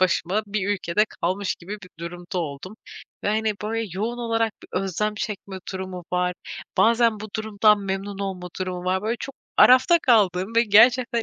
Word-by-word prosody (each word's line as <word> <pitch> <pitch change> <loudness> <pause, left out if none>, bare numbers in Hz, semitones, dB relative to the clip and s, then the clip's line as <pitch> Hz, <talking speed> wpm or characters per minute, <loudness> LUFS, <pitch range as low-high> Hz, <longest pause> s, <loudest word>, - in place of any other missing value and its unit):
başıma 185 +2 +1
bir 200 -1 -2
ülkede 205 0 +1 0.2
kalmış 190 +3 0
gibi 180 +4 -10
bir 185 - -13
durumda 175 +2 -6
oldum 165 +5 -5 0.5
ve, - - +1
hani, 215 0 +1
böyle, 225 +1 -2
yoğun 220 +6 -3
olarak 225 -2 0
bir - - -14
özlem 205 +3 -2
çekme 200 -3 -5
durumu 185 -1 -6
var, 180 0 +1 0.4
bazen 230 -2 +3
bu 215 - -7
durumdan 215 -1 +3
memnun 195 0 -4
olma 190 -3 -4
durumu 180 -1 -3
var. 185 +1 0
Böyle, 225 +3 -1
çok 275 - -6 0.2
arafta 260 +7 +7
kaldığım 205 -4 +3
ve 230 - +5
gerçekten 240 +3 +4
205 Hz, 165 wpm, -24 LUFS, 185-220 Hz, 0.5 s, arafta